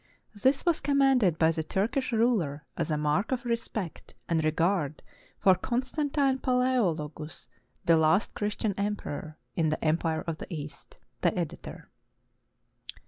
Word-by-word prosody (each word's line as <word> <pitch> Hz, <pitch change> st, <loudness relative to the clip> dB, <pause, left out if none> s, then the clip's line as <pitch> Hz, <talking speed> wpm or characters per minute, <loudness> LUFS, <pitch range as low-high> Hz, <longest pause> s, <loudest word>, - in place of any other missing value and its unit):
This 260 Hz, -, +1 dB
was 340 Hz, -2 st, +3 dB
commanded 270 Hz, -, +3 dB
by 160 Hz, 0 st, +4 dB
the 160 Hz, -1 st, -2 dB
Turkish 225 Hz, -, -1 dB
ruler 210 Hz, -, +1 dB
as -, -, -2 dB
a 155 Hz, -, +1 dB
mark 150 Hz, -, 0 dB
of 255 Hz, -1 st, -1 dB
respect 230 Hz, -6 st, -4 dB
and 165 Hz, -2 st, +1 dB
re 155 Hz, -, +3 dB
gard 160 Hz, -2 st, 0 dB, 0.3 s
for 190 Hz, -, +5 dB
Constantine 265 Hz, -, 0 dB
Palaeologus, 175 Hz, -, 0 dB, 0.4 s
the 165 Hz, -1 st, +5 dB
last 160 Hz, +6 st, +3 dB
Christian 210 Hz, 0 st, -1 dB
emperor 160 Hz, -7 st, -3 dB, 0.2 s
in 160 Hz, -2 st, +2 dB
the 155 Hz, -, -2 dB
Empire 160 Hz, 0 st, +1 dB
of 165 Hz, -2 st, -3 dB
the -, -, -8 dB
East. 150 Hz, -3 st, -8 dB, 0.2 s
The -, -, +2 dB
Editor. -, -, -5 dB
190 Hz, 140 wpm, -28 LUFS, 160-250 Hz, 0.4 s, for